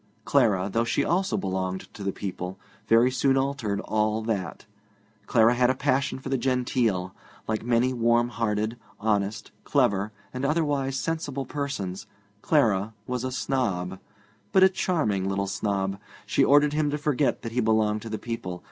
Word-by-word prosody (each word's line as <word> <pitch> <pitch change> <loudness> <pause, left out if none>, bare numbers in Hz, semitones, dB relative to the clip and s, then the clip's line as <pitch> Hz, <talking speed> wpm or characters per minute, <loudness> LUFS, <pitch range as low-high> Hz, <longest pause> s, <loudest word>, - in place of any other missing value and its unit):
Clara, 95 -4 +3
though 115 - +2
she 115 - 0
also 190 +3 +1
belonged 95 -1 -2
to 100 - -8
the 100 - 0
people, 95 -1 -5 0.3
very 115 +3 +5
soon 135 +1 +2
altered 135 -7 -1
all 110 0 0
that. 100 -6 -3 0.6
Clara 115 0 +5
had 125 0 +3
a 130 - +2
passion 135 +1 0
for 135 0 -7
the 135 -1 0
genteel. 120 -7 0 0.3
Like 110 0 -1
many 120 +2 +2
warm 120 0 +2
hearted, 110 -1 -1 0.2
honest, 105 -1 -1
clever, 100 +1 +1 0.2
and 130 +1 -4
otherwise 140 -3 0
sensible 145 -4 -3
persons, 130 -11 -4 0.3
Clara 110 -8 +2
was 125 0 -3
a 130 - -2
snob, 95 -9 -1 0.5
but 190 - +5
a 190 - +8
charming 145 - 0
little 100 0 0
snob. 100 -1 -2 0.3
She - - +2
ordered 145 +1 +5
him 150 -1 +1
to 145 - -1
forget 145 -2 0
that 115 - -4
he 125 - -1
belonged 110 -1 +2
to 115 - -7
the 110 - -3
people. 90 -7 -5
115 Hz, 160 wpm, -26 LUFS, 100-135 Hz, 0.6 s, a